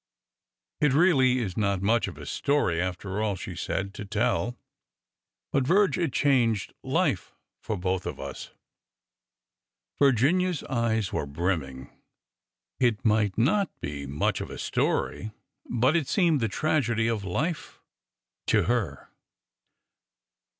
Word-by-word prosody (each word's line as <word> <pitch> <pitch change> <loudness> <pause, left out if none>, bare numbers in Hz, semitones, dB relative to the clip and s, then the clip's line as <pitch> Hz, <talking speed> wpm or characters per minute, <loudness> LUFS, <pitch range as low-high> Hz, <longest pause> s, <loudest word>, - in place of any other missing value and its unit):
'' - - -50
It 150 -3 +4
really 135 -6 +4
is 100 -7 -2
not 100 -3 0
much 115 +3 +2
of - - -8
a - - -9
story, 140 - +1
after 95 +3 -3
all," 105 -2 0
she - - -7
said, 100 +1 -3
to - - -7
tell. 120 +3 -1 0.9
But, 135 - +2
Virge, 195 +6 +3
it 170 -6 0
changed 120 -6 +2
life - - -1 0.3
for 110 - -3
both 95 0 -1
of - - -5
us!" 70 0 -7 1.5
Virginia's 145 +7 +3
eyes 115 -5 -1
were 70 - -1
brimming. 70 -4 -3 0.9
It 120 -3 +1
might 105 -3 +2
not 175 - +2
be 70 -1 -5
much 70 +2 -1
of - - -5
a - - -7
story, 110 - -1 0.4
but 125 +6 +2
it 160 -6 +1
seemed 170 -6 +3
the 115 - +2
tragedy 120 -4 +1
of 115 -3 -1
life 150 - -3 0.7
to - - +3
her. 105 - -2
115 Hz, 130 wpm, -27 LUFS, 95-140 Hz, 1.5 s, It